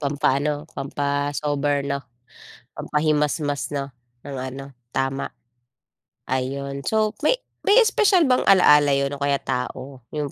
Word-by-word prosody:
Pampa-ano, 145 +1 0
pampa-sober, 145 0 -1
'no. 140 0 -2 0.8
Pampahimasmas, 150 -1 0
'no, 140 -1 -3 0.4
ng 140 -1 -6
ano, 130 +1 -6 0.3
tama. 135 +1 -2 1.0
Ayun 140 +2 -2
so, 215 -1 +2
may 310 +12 +3 0.3
may 405 - +6
espesyal 415 -5 +3
bang 255 -2 +3
alaala 150 -6 +6
yun 140 0 0
o 140 - -6
kaya 140 0 +2
tao? 130 +1 -4 0.2
Yung 145 -2 -2
145 Hz, 115 wpm, -23 LUFS, 140-150 Hz, 1.0 s, may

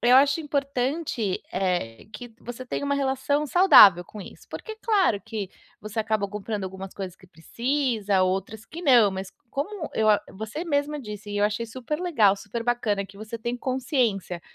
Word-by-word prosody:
eu 245 +1 +5
acho 280 +3 +4
importante, 275 - -2
eh, 175 - -2
que 245 +2 -9
você 245 +1 -7
tenha 255 - -3
uma 280 - +1
relação 280 +1 0
saudável 250 - +8
com 210 - -10
isso, - - -12
porque, 440 -1 -7
claro 390 - +2
que 200 -1 -5 0.3
você 215 +2 -7
acaba 215 -2 0
comprando 210 0 -4
algumas 190 0 -7
coisas 185 -2 -6
que 185 - -19
precisa, 220 - -1
outras 195 +4 -2
que 330 +7 -9
não, 245 - +5
mas, 190 0 -6 0.2
como 315 +4 -4
eu 220 -1 +2
a 210 - +5
você 220 - -6
mesma 295 -2 -1
disse, 210 -3 -8
e 205 - -2
eu 205 - +3
achei 210 +2 -1
super 255 +6 -4
legal, 235 - +3
super 215 +4 -5
bacana, 225 -4 0
que 195 +1 -15
você 215 +2 -7
tem 235 +2 -3
consciência 245 - -1
225 Hz, 175 wpm, -25 LUFS, 200-275 Hz, 0.3 s, saudável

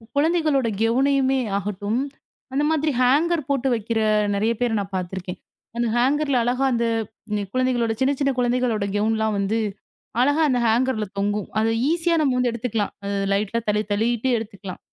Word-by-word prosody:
குழந்தைகளோட 305 -4 +2
கவுனயுமே 265 +3 +2 0.2
ஆகட்டும், 205 +3 -2 0.5
அந்த 285 +2 +1
மாதிரி 310 -1 +1
ஹேங்கர் 295 +4 +2
போட்டு 275 -1 +1
வைக்கிற 225 0 -2 0.4
நிறைய 220 +3 +1
பேர் 235 -3 +1
நான் 195 -1 -6
பாத்திருக்கேன். 185 0 -5 0.4
அந்த 235 0 +1
ஹேங்கர்ல 275 +2 +2
அழகா 250 +3 +1
அந்த 235 0 +1 0.5
நி 205 - -1
குழந்தைகளோட 250 -3 +1
சின்ன 270 +2 +3
சின்ன 275 0 +3
குழந்தைகளோட 245 -4 +1
கவுன்லாம் 220 0 +1
வந்து 205 +3 0 0.6
அழகா 290 +4 +3
அந்த 250 -1 +2
ஹேங்கர்ல 225 -1 +1
தொங்கும். 205 0 -1
அத 225 +1 +2 0.2
ஈசியா 340 0 +1
நம்ம 265 -4 +2
வந்து 250 -1 +1
எடுத்துக்கலாம். 225 -2 -2
அத 200 - -3
த - - -1
லைட்டா 210 +3 0
தள்ளி, 210 +1 +1
தள்ளிட்டு 230 +4 +1
எடுத்துக்கலாம். 200 -4 -7
235 Hz, 155 wpm, -23 LUFS, 210-270 Hz, 0.6 s, சின்ன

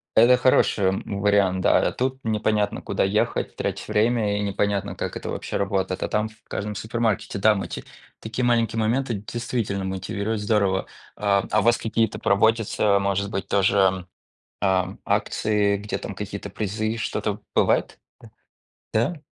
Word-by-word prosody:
это 120 +3 +7
хороший, 125 -5 +3
м, 95 +1 -1
вариант. 100 -2 +3
Да, - - +3
тут 130 +1 -2
непонятно, 105 -1 0
куда - - -1
ехать, 100 +2 0
тратить - - -3
время 105 -1 +2
и - - -1
непонятно, 100 0 -1
как - - -4
это - - -6
вообще - - -3
работает. 95 -2 -1
А - - 0
там 105 +1 0
в 110 0 -23
каждом 105 +1 -4
супермаркете, 110 -2 -1
там 105 -1 +4
эти - - -6 0.4
такие 115 +3 -2
маленькие 115 -2 +2
моменты 120 +2 0
действительно 105 -1 -3
мотивирует 100 +3 -3
здорово. 100 -2 +1 0.3
А, 100 -1 +2
а 105 - +4
у - - 0
вас 120 +1 +4
какие-то 110 -1 -1
проводятся, 105 -1 +2
может 100 0 0
быть, 95 - -3
тоже, 95 -2 +2 0.5
а, 95 -1 +1
акции, 105 -1 +1
где 105 +1 -4
там - - -6
какие-то 100 +1 -6
призы, 110 +2 -2
что-то 105 -2 -2 0.2
бывает, - - +2 0.9
да? 115 +8 +2
Да? 155 - -13
105 Hz, 150 wpm, -24 LUFS, 100-110 Hz, 0.9 s, это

